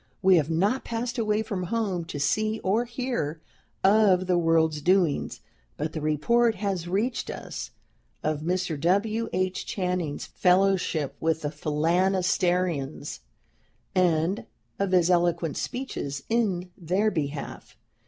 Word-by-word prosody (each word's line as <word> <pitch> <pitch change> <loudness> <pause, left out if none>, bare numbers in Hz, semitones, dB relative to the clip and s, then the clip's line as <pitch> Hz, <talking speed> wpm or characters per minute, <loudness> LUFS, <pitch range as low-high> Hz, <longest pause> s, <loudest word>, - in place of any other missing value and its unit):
We 190 -1 +6
have 155 -1 +1
not 200 +11 +1
passed 235 +2 -3
away 215 -1 +1
from 195 -4 -3
home, 195 -4 -1
to 145 - -6
see 215 +9 +1
or 215 +6 +2
hear 235 - -3 0.4
of 195 -2 +5
the 180 -1 +2
world's 165 -2 +2
doings, 180 -3 +1 0.4
but 155 +1 -3
the 155 - -4
report 220 +11 +2
has 190 -3 -2
reached 210 +8 -1
us - - -6 0.5
of 155 -1 0
Mr. 175 -2 -1
W. 215 +6 +1
H. 185 0 -1
Channing's 180 -6 -2
fellowship 180 -6 +2
with 160 0 0
the 145 - -1
Phalansterians, 175 0 0 0.7
and 180 +1 +1 0.3
of 200 -1 0
his 180 -1 +4
eloquent 170 -3 +1
speeches 140 - -4
in 195 -6 0
their 190 +5 0
behalf. 145 -5 -5
180 Hz, 125 wpm, -26 LUFS, 160-205 Hz, 0.7 s, We